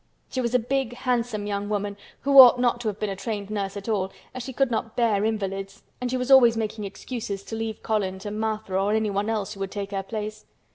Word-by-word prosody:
She 260 Hz, -, -1 dB
was 240 Hz, 0 st, -1 dB
a -, -, +8 dB
big 250 Hz, 0 st, -1 dB
handsome 240 Hz, -4 st, -1 dB
young 205 Hz, 0 st, -2 dB
woman 205 Hz, -1 st, -2 dB, 0.3 s
who 275 Hz, 0 st, +6 dB
ought 250 Hz, -1 st, +10 dB
not 240 Hz, -1 st, +2 dB
to 230 Hz, -, -3 dB
have 210 Hz, -1 st, -2 dB
been 210 Hz, -2 st, -1 dB
a -, -, -3 dB
trained 205 Hz, 0 st, -4 dB
nurse 200 Hz, -1 st, -3 dB
at 200 Hz, -, -8 dB
all, 195 Hz, -4 st, 0 dB, 0.2 s
as 255 Hz, -, -5 dB
she 265 Hz, -, -6 dB
could 265 Hz, 0 st, +1 dB
not 225 Hz, -1 st, -2 dB
bear 220 Hz, -4 st, +2 dB
invalids 195 Hz, -2 st, -3 dB, 0.2 s
and 250 Hz, -, -1 dB
she 255 Hz, -, 0 dB
was 250 Hz, +1 st, -2 dB
always 240 Hz, -4 st, +7 dB
making 215 Hz, -1 st, -3 dB
excuses 200 Hz, -1 st, -5 dB
to 225 Hz, -, -6 dB
leave 225 Hz, -1 st, -4 dB
Colin 200 Hz, -4 st, 0 dB
to 205 Hz, +2 st, -6 dB
Martha 215 Hz, -2 st, -3 dB
or 195 Hz, +2 st, +2 dB
anyone 210 Hz, -1 st, 0 dB
else 215 Hz, -2 st, -2 dB
who 195 Hz, -, -12 dB
would 195 Hz, 0 st, -2 dB
take 200 Hz, 0 st, -5 dB
her 195 Hz, -1 st, -1 dB
place. 215 Hz, +1 st, -6 dB
215 Hz, 240 wpm, -25 LUFS, 200-235 Hz, 0.3 s, ought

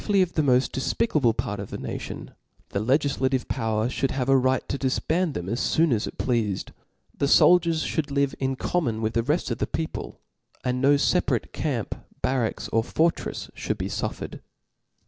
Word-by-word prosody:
y 205 Hz, -, +4 dB
of 185 Hz, -2 st, +3 dB
the 155 Hz, -, +2 dB
mofl: 130 Hz, -2 st, +3 dB
def« 135 Hz, -, -2 dB
picable 135 Hz, -, +2 dB
part 105 Hz, 0 st, -2 dB
of 100 Hz, -, -6 dB
the -, -, -5 dB
nation, -, -, -6 dB, 0.4 s
the 100 Hz, -, -1 dB
legiflative 130 Hz, +1 st, +1 dB
power 110 Hz, -2 st, 0 dB
fliould 135 Hz, +1 st, -1 dB
have 130 Hz, 0 st, -2 dB
a 135 Hz, -, +6 dB
right 130 Hz, 0 st, +2 dB
to -, -, -2 dB
difband 155 Hz, +5 st, 0 dB
them 90 Hz, -, -4 dB
as 115 Hz, +5 st, 0 dB
foon 160 Hz, -4 st, +4 dB
as 110 Hz, -, 0 dB
it -, -, -8 dB
pleafed; 110 Hz, -6 st, -1 dB, 0.4 s
the 140 Hz, -, 0 dB
foldiers 165 Hz, +1 st, +5 dB
fliould 155 Hz, -3 st, -1 dB
live 140 Hz, -1 st, +1 dB
in 135 Hz, 0 st, 0 dB
common 130 Hz, -7 st, -1 dB
with 110 Hz, +1 st, 0 dB
the 115 Hz, -, +2 dB
reft 150 Hz, +9 st, 0 dB
of -, -, -2 dB
the -, -, 0 dB
people; 160 Hz, -1 st, -4 dB, 0.4 s
and 125 Hz, 0 st, -1 dB
no 140 Hz, +1 st, +5 dB
feparatc 140 Hz, -, +1 dB
camp, -, -, -2 dB, 0.3 s
bar 130 Hz, -3 st, +2 dB
facks, -, -, -6 dB
pr -, -, -1 dB
fortrefs 160 Hz, +8 st, -1 dB
fliould -, -, -3 dB
be -, -, -3 dB
fqfiered. -, -, -4 dB
130 Hz, 190 wpm, -25 LUFS, 120-155 Hz, 0.4 s, a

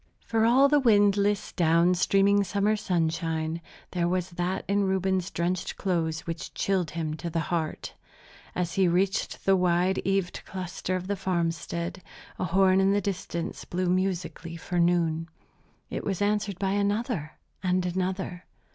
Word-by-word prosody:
For 225 Hz, -1 st, +2 dB
all 260 Hz, +4 st, +6 dB
the 295 Hz, +1 st, +4 dB
windless 205 Hz, -3 st, +3 dB
down 170 Hz, +1 st, +3 dB
streaming 200 Hz, +3 st, +3 dB
summer 200 Hz, +2 st, +1 dB
sunshine, 165 Hz, -3 st, -1 dB, 0.3 s
there 175 Hz, -2 st, 0 dB
was 180 Hz, 0 st, -1 dB
that 175 Hz, +2 st, -2 dB
in 200 Hz, 0 st, +2 dB
Reuben's 190 Hz, -1 st, 0 dB
drenched 175 Hz, +1 st, -2 dB
clothes 160 Hz, -4 st, -1 dB
which 165 Hz, 0 st, -6 dB
chilled 185 Hz, -5 st, 0 dB
him 160 Hz, -2 st, -3 dB
to 170 Hz, -, -4 dB
the 165 Hz, -, -1 dB
heart. 160 Hz, -2 st, -2 dB, 0.6 s
As 175 Hz, -2 st, -1 dB
he 190 Hz, -2 st, +3 dB
reached 185 Hz, +3 st, 0 dB
the 195 Hz, -, +5 dB
wide 180 Hz, +1 st, +2 dB
eaved 195 Hz, -2 st, -1 dB
cluster 185 Hz, 0 st, -4 dB
of 185 Hz, 0 st, -3 dB
the 200 Hz, +1 st, -1 dB
farmstead, 170 Hz, -1 st, -2 dB, 0.4 s
a -, -, 0 dB
horn 190 Hz, +1 st, +4 dB
in 195 Hz, +1 st, +3 dB
the 205 Hz, -, +3 dB
distance 175 Hz, -3 st, -4 dB
blew 180 Hz, 0 st, -2 dB
musically 175 Hz, -3 st, -2 dB
for 175 Hz, +1 st, -2 dB
noon. 165 Hz, -1 st, +2 dB, 0.6 s
It -, -, -3 dB
was 195 Hz, -3 st, -2 dB
answered 205 Hz, -2 st, 0 dB
by 195 Hz, 0 st, 0 dB
another 205 Hz, -, -1 dB, 0.3 s
and 185 Hz, -1 st, +1 dB
another. 185 Hz, 0 st, -3 dB
185 Hz, 150 wpm, -27 LUFS, 170-195 Hz, 0.6 s, all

